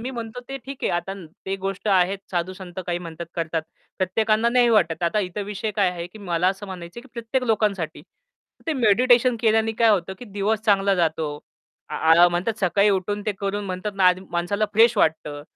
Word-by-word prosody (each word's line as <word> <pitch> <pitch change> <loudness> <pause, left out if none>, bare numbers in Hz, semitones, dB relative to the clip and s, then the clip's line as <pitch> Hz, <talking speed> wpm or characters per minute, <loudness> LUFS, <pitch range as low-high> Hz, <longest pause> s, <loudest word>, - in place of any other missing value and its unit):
मी 250 +3 -4
म्हणतो 235 -1 -6
ते 270 - -4
ठीक 275 0 -7
आहे - - +1
आता 175 +3 -2 0.3
ते 195 - -1
गोष्ट 195 +2 -4
आहेत 190 0 +3
साधू-संत 185 +1 -4
काही 175 -1 -1
म्हणतात 170 -1 -8
करतात. 165 -1 -2 0.4
प्रत्येकांना 215 +4 +2
नाही 245 0 +4
वाटत. 175 -7 +2
आता 170 +5 +1
इतर 190 +1 -4
विषय 205 +1 -4
काय 195 -3 +3
आहे 170 -1 -6
की 180 +5 -14
मला 180 -3 0
असं 195 +2 -4
म्हणायचंय 180 +2 -8
की 270 - -17
प्रत्येक 235 +2 -2
लोकांसाठी 210 -7 0 0.6
ते 325 - +1
मेडिटेशन 245 0 +4
केल्याने 225 -1 +2
काय 230 +1 +3
होतं 190 -3 +1
की - - -9
दिवस 205 0 -1
चांगला 200 -2 +3
जातो. 160 -4 -1 0.5
आ, - - -6
आ 165 +2 +6
म्हणतात 180 +6 -2
सकाळी 200 +2 +3
उठून 205 +2 -1
ते 210 - +1
करून 200 +1 -2
म्हणतात 190 +2 -4
ना, 195 - +2
आ 180 - +7 0.2
माणसाला 175 +5 0
फ्रेश 225 +2 +5
वाटतं. 150 -5 0
195 Hz, 195 wpm, -23 LUFS, 175-220 Hz, 0.6 s, आ